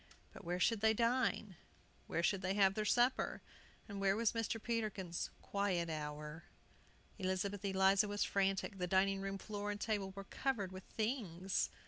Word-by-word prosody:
But - - -11
where 175 +1 -2
should 225 +2 +3
they 220 0 +4
dine? 230 -5 +1 0.5
where 170 - -1
should 195 +1 +2
they 190 0 0
have 195 -2 +5
their 215 +1 -1
supper? 245 +4 +2 0.4
and 200 -2 -5
where 195 0 +3
was 225 0 +2
Mr. 225 0 -1
Peterkin's 210 -7 -2
"quiet 185 -5 0
hour"? 150 +1 -5 0.7
Elizabeth 190 +1 -1
Eliza 195 +1 +4
was 205 0 0
frantic; 195 0 0
the 180 - 0
dining 195 +1 +3
room 195 0 -3
floor 205 +1 -4
and 205 0 -3
table 205 -3 -1
were 195 - -5
covered 210 -4 -2
with 185 0 -9
things. 200 -6 -1
195 Hz, 160 wpm, -37 LUFS, 185-215 Hz, 0.7 s, have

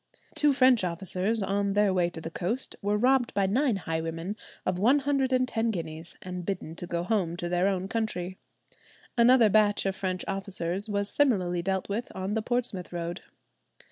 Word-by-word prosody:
Two 295 -1 +3
French 255 -5 +5
officers 185 +4 0
(on 200 0 0
their 205 -1 +3
way 175 -2 +2
to 170 - -8
the 165 0 -6
coast) 215 +11 -3
were 205 +1 +1
robbed 250 +2 +2
by 200 -1 +3
nine 245 +5 +2
highwaymen 165 +1 -3 0.3
of 185 -1 0
one 245 +8 +5
hundred 275 -2 +1
and 255 0 +2
ten 230 -1 0
guineas, 165 -4 -5
and 180 -1 -5
bidden 170 -3 -4
to 175 - -6
go 170 -1 -2
home 180 -4 0
to 175 - -3
their 175 +2 +2
own 190 -1 -1
country. 190 -4 -3 0.8
Another 240 -1 +6
batch 205 0 +3
of 195 0 0
French 185 -1 -3
officers 195 0 -3
was 200 -1 +1
similarly 185 -11 +2
dealt 190 +1 -1
with 220 +4 -3
on 190 +2 -3
the 220 - 0
Portsmouth 230 -6 -2
road. 175 +1 -4
195 Hz, 180 wpm, -28 LUFS, 180-225 Hz, 0.8 s, Another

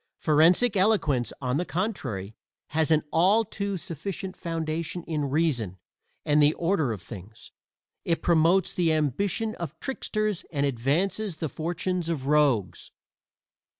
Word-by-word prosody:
Forensic 170 +9 +4
eloquence, 185 - +2
on 125 +1 0
the 175 - 0
contrary, 140 - -3 0.4
has 155 0 +1
an 155 -1 +3
all 200 +7 +4
too 200 -1 -3
sufficient 185 +2 -6
foundation 165 0 -3
in 155 -4 -2
reason 130 - 0 0.5
and 150 0 +4
the 145 +1 +4
order 165 -7 +1
of 100 -6 -6
things: 105 +2 -11 0.5
it 165 -1 -1
promotes 170 +2 +3
the 170 -3 +2
ambition 180 - 0
of 170 -2 -6
tricksters 215 -7 -2
and 145 -3 0
advances 160 - 0
the 160 -1 -3
fortunes 175 +2 -2
of 150 -6 -2
rogues. 140 -9 +1
160 Hz, 130 wpm, -26 LUFS, 145-185 Hz, 0.5 s, Forensic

